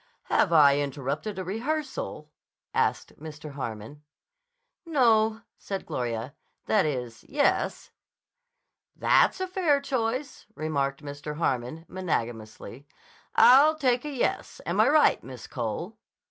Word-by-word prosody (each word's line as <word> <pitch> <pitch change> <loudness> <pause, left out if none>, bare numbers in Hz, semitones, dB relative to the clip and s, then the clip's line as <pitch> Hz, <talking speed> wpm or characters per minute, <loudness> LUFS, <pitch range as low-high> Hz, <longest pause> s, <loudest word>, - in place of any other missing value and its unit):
"Have - - +3
I 145 -3 +6
interrupted 145 +8 -3
a 190 - -3
rehearsal?" 290 - -4 0.4
asked - - -1
Mr. 150 -1 -9
Harmon. 125 +1 -7 0.8
"No," 225 -8 +3 0.2
said 195 -1 -5
Gloria. 120 +1 -3 0.3
"That 205 -7 +3
is, 125 -6 -4
yes." 285 0 0 1.0
"That's - - +3
a 375 - -2
fair 355 -6 +2
choice," 260 0 -3
remarked 140 -3 -2
Mr. 145 +1 -6
Harmon 145 +1 -2
magnanimously. 120 -6 -4 0.5
"I'll 290 +5 +7
take 255 -5 +1
yes. 290 - -2
Am - - -1
I - - +5
right, 300 +1 +4
Miss 130 -2 -9
Cole?" 130 - -5
165 Hz, 110 wpm, -27 LUFS, -, 1.0 s, I'll